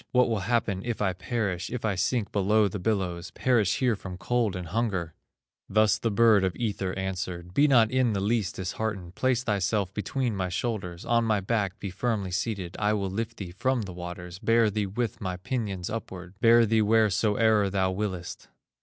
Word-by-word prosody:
What 125 0 +5
will 110 -2 0
happen 110 -5 +1
if 120 -2 -3
I 95 -3 +1
perish, 95 -2 -2
If 120 -2 -4
I 105 - +1
sink 105 +3 0
below 105 +1 +3
the 100 +1 -5
billows, 95 -3 -1
Perish 120 -6 +1
here 125 -4 +2
from 95 -2 -8
cold 115 0 0
and 90 -3 -6
hunger?" 95 -6 -1 0.6
Thus 110 0 +3
the 115 - 0
bird 110 -2 +5
of 95 -3 0
Ether 100 -4 -2
answered: 90 -2 -4
"Be 145 +8 +4
not 115 -6 +5
in 130 -3 +2
the 100 - -1
least 105 -2 0
disheartened, 95 -1 -4
Place 130 +3 +1
thyself 100 -3 0
between 120 +2 -2
my 95 -1 -2
shoulders, 90 -3 -3
On 115 0 +2
my 110 -2 +2
back 100 -1 -1
be 100 -2 -5
firmly 100 -1 -2
seated, 95 -2 -3
I 105 0 +2
will 100 -3 -1
lift 115 +3 -4
thee 95 -4 -6
from 125 +5 0
the 95 -2 -7
waters, 90 0 -7
Bear 115 0 +3
thee 105 0 -1
with 110 +3 -3
my 90 -2 -3
pinions 100 -3 -3
upward, 95 -5 -6
Bear 115 0 +6
thee 110 0 +2
wheresoe'er 110 0 +3
thou 95 -1 +1
willest. 95 -3 -4
105 Hz, 190 wpm, -27 LUFS, 95-115 Hz, 0.6 s, Bear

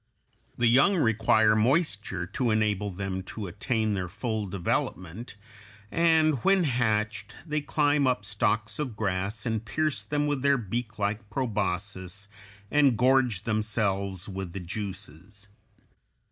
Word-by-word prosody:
The 120 - +2
young 135 +12 +5
require 110 - +3
moisture 110 - +1
to 115 +6 -1
enable 105 -2 +1
them 95 0 -4
to 105 +2 -7
attain 110 +4 -1
their 95 -2 -2
full 110 +2 -3
development, 95 +2 -3 0.6
and 160 -5 +3
when 195 -1 +4
hatched 110 - 0
they 150 -2 -1
climb 145 -1 +2
up 120 -5 0
stalks 110 +2 -1
of 130 -7 -3
grass 100 +2 -2
and 110 -2 -1
pierce 155 +6 -1
them 145 0 -1
with 145 -2 -1
their 140 0 +4
beaklike 105 -2 -3
proboscis 100 -4 -2 0.4
and 140 -5 +4
gorge 125 -5 +3
themselves 100 -4 -1
with 95 -3 -5
the 100 - -4
juices. 100 +1 -7
110 Hz, 125 wpm, -27 LUFS, 100-125 Hz, 0.6 s, young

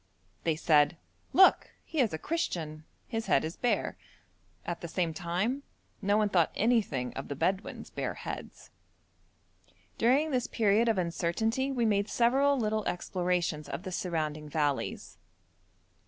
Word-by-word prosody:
They 165 -2 +2
said, 155 +1 +3 0.3
'Look! 380 - +6 0.2
he 320 - -4
is 235 -7 +3
a 160 - -3
Christian, 160 - -3 0.2
his 225 -1 -3
head 135 - +3
is 160 - -5
bare.' 245 - 0 0.7
At 175 - -4
the 170 - -5
same 170 -1 -1
time 180 - -1 0.4
no 205 +1 +2
one 215 -1 +3
thought 175 -5 +3
anything 200 - +1
of 135 - -6
the 140 - -4
Bedouin's 190 +7 -2
bare - - -3
heads. - - -8 1.3
During 275 +7 +3
this 250 -2 0
period 220 +1 +3
of 220 - +2
uncertainty 220 +10 0
we 245 -3 +1
made 205 -1 +1
several 270 +4 +3
little 215 -2 0
explorations 175 -3 -1
of 175 - -5
the 185 - -5
surrounding 155 -4 -2
valleys. 145 -2 -2
185 Hz, 140 wpm, -30 LUFS, 160-235 Hz, 1.3 s, Look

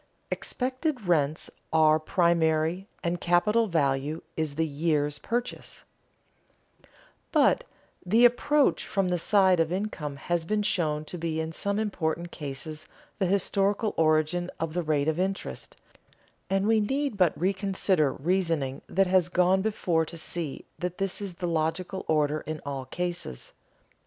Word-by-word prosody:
[Sidenote: - - -41
Expected 255 - -2
rents 155 -3 +1 0.2
are 155 -1 +5
primary, 165 +1 +1 0.2
and 170 0 -1
capital 210 +6 +3
value 145 -2 0
is 155 -3 -1
the 160 +1 +1
"years' 150 -1 0
purchase"] 240 +1 -4 1.5
But - - +3 0.4
the 225 +7 +5
approach 275 +4 +3
from 195 -3 0
the 180 -1 0
side 190 -1 +4
of 165 0 +2
income 180 -7 -3
has 170 +4 -1
been 210 +5 0
shown 155 -7 0
to 175 - -6
be 160 -1 -2
in 160 0 -2
some 200 +5 -2
important 175 -5 -2
cases 150 +2 -6 0.3
the 190 - +2
historical 200 +2 +1
origin 160 +3 +2
of 165 -1 -2
the 175 - 0
rate 150 -3 0
of 160 +2 0
interest, 190 +1 -3 0.7
and 195 +1 +1
we 220 0 +4
need 270 +4 -1
but 180 -4 +2
reconsider 190 -4 +1
reasoning 165 -4 -1
that 195 +1 +3
has 180 -1 +3
gone 180 +1 +3
before 185 -6 +1
to 170 - -8
see 160 -2 -4
that 180 0 -3
this 195 0 -2
is 195 -4 -5
the 175 - -3
logical 170 +4 -2
order 150 -1 +1
in 155 0 -3
all 135 -2 -4
cases. 175 - -4
175 Hz, 145 wpm, -27 LUFS, 155-195 Hz, 1.5 s, are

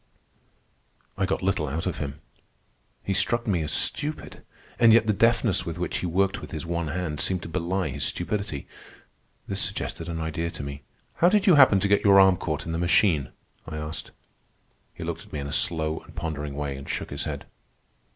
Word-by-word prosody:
I 95 - 0
got 95 - -1
little 95 -5 +1
out 80 +6 -3
of 90 - -2
him. 70 0 -5 0.8
He 100 - -1
struck 120 +5 +1
me 95 -6 +1
as 75 0 -2
stupid, 150 - -3 0.4
and 115 -1 +7
yet 115 -1 +6
the 105 - +2
deftness 115 -1 +3
with 85 -1 -5
which 90 - -2
he 90 - -2
worked 95 +3 +1
with - - -8
his - - -5
one 85 -1 -2
hand 80 -1 -3
seemed 90 +5 0
to - - -6
belie 90 +2 -1
his - - -4
stupidity. 90 -4 -2 0.8
This - - -1
suggested 85 +1 -3
an 80 -1 -3
idea 80 +1 -2
to 75 - -6
me. 70 0 -6 0.4
"How 175 - +5
did 205 0 +3
you 190 - +7
happen 130 -9 +7
to 100 - +2
get 100 0 +3
your 100 -1 +7
arm 95 -2 +6
caught 75 -5 -3
in 80 - -4
the 80 - -1
machine?" 85 - +3 0.4
I 80 -1 -5
asked. 75 +1 -5 0.8
He - - -8
looked - - -4
at - - -20
me - - -2
in 70 - -4
a - - -6
slow 80 0 0
and 80 - -17
pondering 75 -4 -4
way, 70 -1 -3
and 70 - -9
shook - - -3
his - - -3
head. - - -5
85 Hz, 205 wpm, -26 LUFS, 80-100 Hz, 0.8 s, and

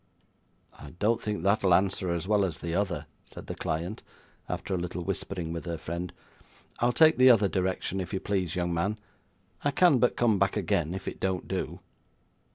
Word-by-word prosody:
'I 75 +2 -11
don't 110 +4 +1
think 105 -5 -3
that'll 100 -2 +4
answer 95 0 +1
as 85 +1 -2
well 105 -1 +3
as 90 -5 -1
the 85 -1 -4
other,' 95 -1 -1 0.2
said - - -11
the - - -5
client, 85 +7 -3 0.5
after 100 - -3
a - - +1
little 90 0 -4
whispering 85 -1 -3
with 85 - -5
her 85 -1 -2
friend. 85 +2 -5 0.7
'I'll 120 +1 +3
take 160 +5 +5
the 130 0 +8
other 110 -5 +6
direction, 95 0 -1
if 90 - -6
you 95 - -1
please, 95 -4 -1
young 90 -1 -1
man. 95 +6 0 0.7
I 145 - +3
can 145 -1 +4
but 125 - +2
come 110 -5 +3
back 100 +2 +2
again, 85 -3 0
if 95 - -7
it - - -5
don't 95 -2 -1
do. - - -4
95 Hz, 190 wpm, -28 LUFS, 85-105 Hz, 0.7 s, the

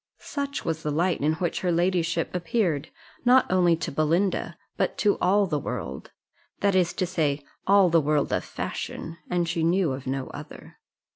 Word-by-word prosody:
Such 280 -1 -4
was 160 -1 -2
the 150 - -2
light 170 +4 +1
in 150 +2 +2
which 170 +1 -2
her 180 - +1
ladyship 170 -1 +1
appeared, 175 -4 0 0.3
not 250 +1 +6
only 175 -2 +4
to 165 - -4
Belinda, 165 +7 0 0.2
but - - -1
to 205 -1 +3
all 200 +2 +3
the 150 -5 -1
world - - -5 0.5
that 200 -1 +3
is 180 -2 +3
to 185 - -1
say, 150 -5 -1 0.2
all 200 -1 +6
the 165 -1 +5
world 150 0 +1
of - - 0
fashion, 165 +1 -5
and 175 -1 0
she 165 0 -1
knew 170 -1 +2
of 130 0 -6
no 135 0 -2
other. - - -11
170 Hz, 175 wpm, -26 LUFS, 155-185 Hz, 0.5 s, not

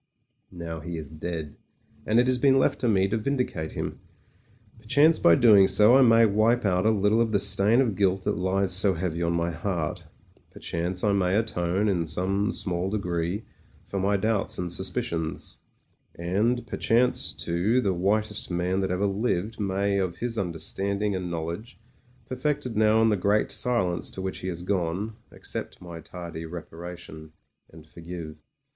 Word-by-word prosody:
Now 85 -2 -7
he 85 +1 -6
is 75 -2 -7
dead: 80 -1 -6 0.5
and 110 +2 +4
it 120 - +4
has 130 -1 +1
been 135 0 +4
left 135 - +2
to 125 - +1
me 95 -3 +3
to 115 - 0
vindicate 125 - -2
him. - - -5 0.8
Per 110 - -22
chance 145 +8 +4
by 85 - +6
so - - -1
doing 105 -5 +7
I 120 +6 +7
may 115 -2 +6
wipe 110 +3 +2
out 95 +1 +2
a - - +6
little 105 +1 +2
of 115 -1 +1
the 100 - +2
stain 100 +4 +3
of 115 -7 0
guilt 95 -1 +1
that - - 0
lies 95 +1 0
so 95 0 +2
heavy 85 -1 -3
on 85 0 0
my 85 0 0
heart; 85 -2 -3 0.4
per - - -14
chance 90 +2 -2
I 105 -2 +3
may 95 -1 +1
atone, 100 -2 0
in 85 -5 0
some 95 +5 0
small 90 0 -1
degree, 90 -1 -2 0.4
for 100 - -4
my 100 +1 +1
doubts 105 0 0
and 90 -1 -3
suspicions; 80 -2 -3 0.6
and, 105 +8 0
perchance 120 +1 +1
too, 90 +9 0
the 100 -6 +1
whitest 105 +4 0
man 90 +1 -1
that 95 - -1
ever 90 +2 0
lived 105 +1 -1
may 100 0 0
of 90 -3 -2
his 120 +3 -3
understanding 100 +2 -2
and 90 -1 -4
knowledge, 85 +9 -5 0.5
perfected 130 -1 -2
now 110 +1 +4
in 115 - +4
the 105 - +2
Great 100 +3 +1
Silence 95 -8 0
to 95 - -6
which 95 - -4
he 90 - -6
has 85 -1 -5
gone, 95 +3 -2 0.2
accept - - -6
my 85 -2 -9
tardy 85 0 -8
reparation, 80 -1 -9 0.4
and 80 -1 -15
forgive. 85 0 -9
95 Hz, 175 wpm, -26 LUFS, 85-110 Hz, 0.8 s, doing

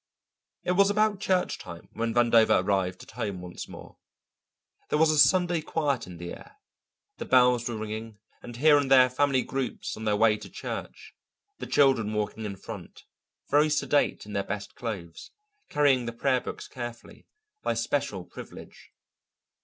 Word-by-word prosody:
It - - 0
was 195 +2 +4
about 210 -1 +2
church 185 -2 0
time 85 0 -10
when 115 0 -2
Vandover 115 -4 +4
arrived 95 -2 -1
at - - -14
home 110 -5 -4
once 90 0 -8
more. - - -12 0.9
There - - +1
was 160 0 +4
a 155 - +2
Sunday 175 +3 +4
quiet 145 - -1
in 90 -1 -10
the 85 0 -7
air. - - -13 0.6
The - - -4
bells 125 -1 +4
were 115 - -4
ringing, 110 0 -6 0.2
and 120 - -9
here 145 +2 +6
and 140 -2 -2
there 130 -1 +6
family 135 -1 +2
groups 135 -1 -4
on 110 - -7
their 105 -1 +2
way 105 0 +4
to - - -11
church, - - -7 0.5
the - - -6
children 130 -7 +3
walking 105 +1 -3
in 100 -2 -4
front, 100 -2 -10 0.5
very 150 +2 +4
sedate 150 -4 +1
in 105 - -9
their 100 - 0
best 100 +1 -5
clothes, 95 -9 -6 0.4
carrying 135 -5 +3
the 115 - -4
prayer 130 +1 +1
books - - -7
carefully, 120 -2 -9 0.3
by - - -1
special - - -2
privilege. - - -12
120 Hz, 165 wpm, -27 LUFS, 105-145 Hz, 0.9 s, here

